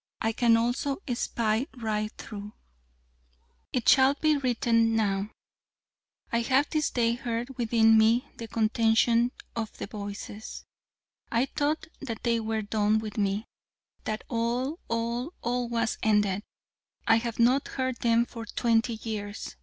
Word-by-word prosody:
I 225 Hz, -, +1 dB
can 230 Hz, 0 st, +4 dB
also 245 Hz, +4 st, 0 dB, 0.2 s
spy 230 Hz, +1 st, 0 dB
right 215 Hz, -2 st, -2 dB
through 210 Hz, -1 st, -8 dB, 1.2 s
It 250 Hz, -3 st, -2 dB
shall 265 Hz, +1 st, +6 dB
be 310 Hz, +1 st, +2 dB
written 230 Hz, -4 st, +2 dB
now: 200 Hz, -2 st, 0 dB, 1.0 s
I 235 Hz, -, +2 dB
have 270 Hz, +4 st, +2 dB
this 310 Hz, -2 st, +1 dB
day 235 Hz, -1 st, +1 dB
heard 240 Hz, +2 st, -4 dB
within 225 Hz, -2 st, +4 dB
me 230 Hz, +5 st, +3 dB
the 230 Hz, -, -6 dB
contention 230 Hz, +2 st, +3 dB, 0.2 s
of 225 Hz, -2 st, -4 dB
the -, -, -4 dB
Voices. 205 Hz, +1 st, -7 dB, 0.7 s
I 235 Hz, +2 st, +2 dB
thought 295 Hz, +3 st, -1 dB
that 230 Hz, -6 st, -6 dB
they 235 Hz, -1 st, +2 dB
were 220 Hz, -1 st, -2 dB
done 210 Hz, +1 st, +2 dB
with 215 Hz, -1 st, -4 dB
me! 200 Hz, +2 st, 0 dB, 0.6 s
That 215 Hz, 0 st, -3 dB
all, 245 Hz, +6 st, -1 dB
all, 235 Hz, +6 st, -2 dB
all, 245 Hz, 0 st, -1 dB
was 230 Hz, -1 st, -1 dB
ended! 205 Hz, -2 st, +2 dB, 0.7 s
I 225 Hz, -, +6 dB
have 230 Hz, -1 st, -3 dB
not 250 Hz, +4 st, +3 dB
heard 260 Hz, -2 st, -2 dB
them 235 Hz, 0 st, +3 dB
for 230 Hz, -2 st, -8 dB
twenty 230 Hz, +1 st, +1 dB
years! 210 Hz, -2 st, -5 dB
230 Hz, 140 wpm, -28 LUFS, 220-245 Hz, 1.2 s, shall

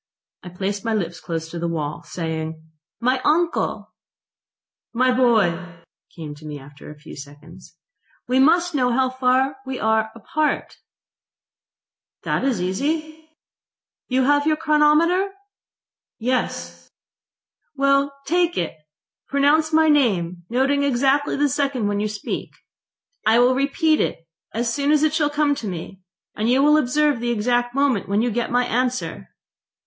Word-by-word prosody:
I 180 Hz, -, -9 dB
placed 195 Hz, +3 st, -4 dB
my 225 Hz, -1 st, 0 dB
lips 175 Hz, -4 st, -3 dB
close 165 Hz, -1 st, -4 dB
to 170 Hz, -, -5 dB
the 170 Hz, -, -2 dB
wall, 155 Hz, -3 st, -3 dB
saying: 160 Hz, -1 st, -5 dB, 0.4 s
"My 255 Hz, +2 st, +1 dB
uncle!".... 330 Hz, +2 st, 0 dB, 1.0 s
"My 255 Hz, +2 st, +2 dB
boy!" 180 Hz, -9 st, +1 dB, 0.3 s
came 155 Hz, -3 st, -7 dB
to 155 Hz, -, -14 dB
me 150 Hz, -1 st, -6 dB
after 145 Hz, +1 st, -13 dB
a 150 Hz, -, -11 dB
few 150 Hz, +2 st, -12 dB
seconds..... 150 Hz, +5 st, -13 dB, 0.5 s
"We 255 Hz, +1 st, +2 dB
must 340 Hz, +5 st, +4 dB
know 250 Hz, -4 st, +1 dB
how 260 Hz, +1 st, +1 dB
far 260 Hz, +1 st, +1 dB
we 265 Hz, -1 st, -5 dB
are 220 Hz, 0 st, +1 dB
apart.".... 300 Hz, +8 st, -2 dB, 1.5 s
"That -, -, -1 dB
is 260 Hz, -7 st, 0 dB
easy.".... 310 Hz, -, -3 dB, 0.8 s
"You 260 Hz, 0 st, +1 dB
have 290 Hz, +2 st, +3 dB
your 310 Hz, -, +3 dB
chronometer?"... 320 Hz, +5 st, +3 dB, 0.8 s
"Yes.".... 250 Hz, +2 st, -3 dB, 0.9 s
"Well, 275 Hz, 0 st, +2 dB
take 345 Hz, +3 st, +1 dB
it. 170 Hz, -, -2 dB, 0.5 s
Pronounce 295 Hz, +3 st, +3 dB
my 320 Hz, 0 st, +4 dB
name, 185 Hz, -, +1 dB
noting 270 Hz, +4 st, +1 dB
exactly 280 Hz, +1 st, +1 dB
the 290 Hz, +1 st, +2 dB
second 275 Hz, -5 st, -1 dB
when 205 Hz, 0 st, -1 dB
you 210 Hz, -, 0 dB
speak. 210 Hz, -1 st, -5 dB, 0.7 s
I 220 Hz, +1 st, +4 dB
will 245 Hz, +1 st, +5 dB
repeat 295 Hz, +4 st, +1 dB
it 165 Hz, -, -3 dB, 0.2 s
as 235 Hz, +1 st, -1 dB
soon 285 Hz, +2 st, 0 dB
as 305 Hz, 0 st, +3 dB
it 310 Hz, -1 st, +2 dB
shall 310 Hz, -2 st, +1 dB
come 295 Hz, 0 st, +1 dB
to 235 Hz, -6 st, -5 dB
me, 185 Hz, +1 st, -7 dB, 0.3 s
and 215 Hz, +2 st, -1 dB
you 260 Hz, +3 st, +4 dB
will 300 Hz, +1 st, +5 dB
observe 295 Hz, 0 st, +2 dB
the 240 Hz, +1 st, -2 dB
exact 240 Hz, +2 st, 0 dB
moment 275 Hz, -9 st, +1 dB
when 205 Hz, +3 st, +1 dB
you 245 Hz, -, 0 dB
get 240 Hz, +2 st, -2 dB
my 245 Hz, 0 st, +2 dB
answer." 250 Hz, +1 st, -2 dB
255 Hz, 145 wpm, -22 LUFS, 200-290 Hz, 1.5 s, will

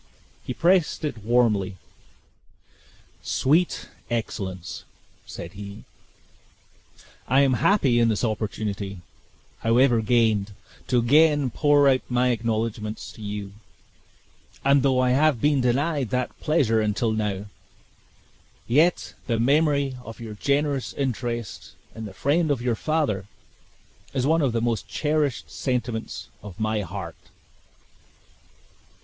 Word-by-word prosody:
He 125 Hz, -, -5 dB
pressed 175 Hz, -2 st, +2 dB
it 120 Hz, -8 st, -5 dB
warmly. 105 Hz, -5 st, +2 dB, 1.4 s
"Sweet 160 Hz, +7 st, +1 dB, 0.2 s
excellence!" 95 Hz, -6 st, -4 dB, 0.4 s
said 85 Hz, +2 st, -8 dB
he, 100 Hz, 0 st, -9 dB, 1.4 s
"I 135 Hz, +3 st, +4 dB
am 135 Hz, -2 st, +3 dB
happy 130 Hz, -, +3 dB
in 115 Hz, -1 st, +4 dB
this 105 Hz, -4 st, -1 dB
opportunity, 105 Hz, -3 st, -3 dB, 0.6 s
however 120 Hz, +1 st, +3 dB
gained, 110 Hz, -3 st, +2 dB, 0.3 s
to 125 Hz, -, +2 dB
again 145 Hz, +2 st, +4 dB
pour 145 Hz, +2 st, +4 dB
out 130 Hz, -1 st, +4 dB
my 125 Hz, 0 st, +2 dB
acknowledgments 110 Hz, -2 st, -2 dB
to -, -, -14 dB
you; 105 Hz, -1 st, -5 dB, 1.1 s
and 140 Hz, 0 st, +5 dB
though 130 Hz, -1 st, +2 dB
I 125 Hz, 0 st, +3 dB
have 145 Hz, -1 st, +3 dB
been 145 Hz, +1 st, +2 dB
denied 135 Hz, +1 st, 0 dB
that 125 Hz, -1 st, -2 dB
pleasure 125 Hz, -8 st, +2 dB
until 110 Hz, +2 st, 0 dB
now, 105 Hz, -2 st, -2 dB, 1.2 s
yet 155 Hz, +8 st, +2 dB
the 115 Hz, -3 st, 0 dB
memory 140 Hz, +1 st, +2 dB
of 115 Hz, 0 st, -10 dB
your 115 Hz, -2 st, -7 dB
generous 140 Hz, +3 st, 0 dB
interest 120 Hz, -4 st, -4 dB, 0.2 s
in 110 Hz, 0 st, -7 dB
the 100 Hz, -, -8 dB
friend 155 Hz, -, +1 dB
of 140 Hz, -4 st, +1 dB
your 120 Hz, 0 st, 0 dB
father, 125 Hz, -9 st, -1 dB, 0.9 s
is 130 Hz, -1 st, +1 dB
one 160 Hz, +3 st, +3 dB
of 135 Hz, -4 st, +2 dB
the 115 Hz, 0 st, -1 dB
most 115 Hz, -3 st, -1 dB
cherished 150 Hz, -4 st, -1 dB
sentiments 120 Hz, -3 st, -3 dB
of 105 Hz, 0 st, -11 dB
my 110 Hz, -1 st, 0 dB
heart!" 95 Hz, -2 st, -6 dB
120 Hz, 120 wpm, -24 LUFS, 110-140 Hz, 1.4 s, and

